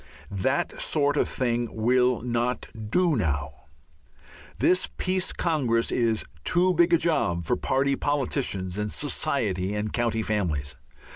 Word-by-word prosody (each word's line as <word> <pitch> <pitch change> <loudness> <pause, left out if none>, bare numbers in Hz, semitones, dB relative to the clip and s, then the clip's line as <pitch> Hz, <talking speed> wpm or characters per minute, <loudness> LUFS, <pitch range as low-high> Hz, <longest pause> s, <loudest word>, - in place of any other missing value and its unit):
That 100 +8 -1
sort 145 -1 +2
of - - +1
thing 120 -2 0
will 125 +2 +2
not 120 +1 -1 0.2
do 175 +4 +3
now. 80 - -2 0.9
This 185 0 +2
Peace 185 0 0
Congress 130 -9 0
is 115 -3 +1 0.2
too 180 +2 +3
big 170 0 +3
a 170 - +6
job 90 - 0
for 125 - +1
party 135 +2 +1
politicians 130 -10 -1
and 105 0 -2
society 105 -9 -1
and 105 0 -3
county 115 -2 0
families. 85 -10 -2
120 Hz, 130 wpm, -26 LUFS, 105-145 Hz, 0.9 s, a